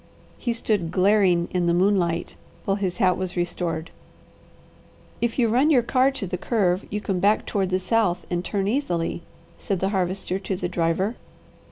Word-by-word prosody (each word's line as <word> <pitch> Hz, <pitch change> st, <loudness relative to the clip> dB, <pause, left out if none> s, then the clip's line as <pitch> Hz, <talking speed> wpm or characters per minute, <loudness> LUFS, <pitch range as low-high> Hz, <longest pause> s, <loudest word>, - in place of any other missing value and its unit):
He 240 Hz, -, -1 dB
stood 210 Hz, -7 st, -1 dB
glaring 185 Hz, -2 st, +3 dB
in 180 Hz, -1 st, 0 dB
the 170 Hz, -, +3 dB
moonlight 175 Hz, -3 st, +1 dB, 0.3 s
while 195 Hz, -, +1 dB
his 185 Hz, -3 st, -2 dB
hat 185 Hz, -2 st, +3 dB
was 185 Hz, -1 st, -3 dB
restored. 170 Hz, -2 st, -2 dB, 1.3 s
"If 235 Hz, -1 st, 0 dB
you 240 Hz, -3 st, +3 dB
run 255 Hz, +7 st, +3 dB
your 255 Hz, -6 st, +4 dB
car 255 Hz, +2 st, +3 dB
to 270 Hz, -7 st, -5 dB
the 180 Hz, -1 st, -4 dB
curve 190 Hz, -5 st, +1 dB
you 210 Hz, -, -2 dB
can 195 Hz, -3 st, -2 dB
back 205 Hz, +4 st, +2 dB
toward 195 Hz, -3 st, -1 dB
the 185 Hz, -, +2 dB
south 190 Hz, -1 st, 0 dB
and 175 Hz, 0 st, -1 dB
turn 195 Hz, 0 st, -1 dB
easily," 175 Hz, -10 st, -1 dB, 0.4 s
said 195 Hz, -3 st, -2 dB
the 190 Hz, -, 0 dB
Harvester 190 Hz, -1 st, -1 dB
to 195 Hz, 0 st, -3 dB
the 180 Hz, -1 st, -3 dB
driver. 175 Hz, +5 st, 0 dB
190 Hz, 175 wpm, -24 LUFS, 175-210 Hz, 1.3 s, your